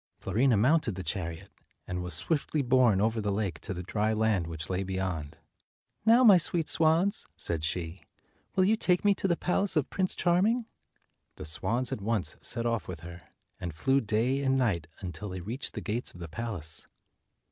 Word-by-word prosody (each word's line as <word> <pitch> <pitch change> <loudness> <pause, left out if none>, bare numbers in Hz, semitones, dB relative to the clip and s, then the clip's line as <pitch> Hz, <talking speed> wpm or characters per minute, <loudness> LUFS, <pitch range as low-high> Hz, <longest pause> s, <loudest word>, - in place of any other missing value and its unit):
Fiorina 115 +5 +2
mounted 125 - +3
the 95 - -5
chariot, 85 +1 -4 0.3
and 90 0 -4
was 90 0 -1
swiftly 150 -2 0
borne 125 -5 +4
over 110 +2 +1
the 105 -1 -1
lake 100 -6 -2
to 105 - -7
the 90 -1 -4
dry 105 +3 0
land 110 -6 +1
which 80 -1 -5
lay 95 0 -1
beyond. 90 -5 -3 0.7
"Now, 235 +3 +7
my 200 -7 +8
sweet 165 -1 0
swans," 165 +6 +2
said 80 -2 0
she, 85 +2 -2 0.5
"will 185 - +4
you 210 +4 +4
take 180 -2 +1
me 205 - +6
to 195 - -2
the 170 -2 +1
palace 190 +2 +1
of 150 -4 0
Prince 185 -1 0
Charming?" 205 +7 +2 0.7
The - - -8
swans 115 +10 0
at - - -3
once 100 -7 0
set 120 -1 -1
off 115 -2 -1
with 85 -4 -7
her, 85 0 -9 0.4
and 85 -5 -5
flew 135 - +2
day 115 +5 0
and 135 0 +2
night 95 -11 0
until 90 +2 -6
they 95 0 -5
reached 115 - -5
the - - -4
gates 115 -1 -3
of - - -12
the 85 - -6
palace. 85 -4 -4
110 Hz, 190 wpm, -29 LUFS, 90-140 Hz, 0.7 s, my